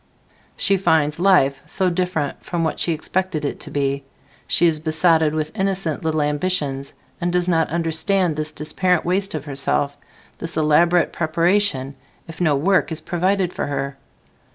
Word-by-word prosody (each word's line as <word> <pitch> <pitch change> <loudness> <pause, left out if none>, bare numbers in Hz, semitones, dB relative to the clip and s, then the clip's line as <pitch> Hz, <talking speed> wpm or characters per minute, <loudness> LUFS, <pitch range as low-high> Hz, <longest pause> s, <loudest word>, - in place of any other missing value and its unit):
She 195 -1 +2
finds 155 -4 +1
"life" 140 -8 +3
so 185 -1 0
different 170 -5 -2
from 170 -2 -2
what 160 - -1
she 170 - +1
expected 165 0 -2
it - - -3
to - - -6
be. 140 -1 -1 0.4
She - - +3
is 160 -2 +2
besotted 160 0 +2
with 155 0 -3
innocent 190 -5 -1
little 155 -1 0
ambitions, 145 -3 -1 0.3
and 175 0 0
does 180 0 +1
not 165 -2 +2
understand 170 +2 +1
this 155 0 -3 0.2
apparent 180 -3 +1
waste 190 +1 0
of 150 -2 -5
herself, 140 0 0 0.4
this 165 -1 -6
elaborate 165 +3 +3
preparation, 165 -4 +1 0.3
if 165 +1 -9
no 155 -4 +3
work 180 +6 +2
is 160 - -2
provided 185 +1 0
for - - -3
her. 140 -1 -3
160 Hz, 155 wpm, -21 LUFS, 150-180 Hz, 0.4 s, life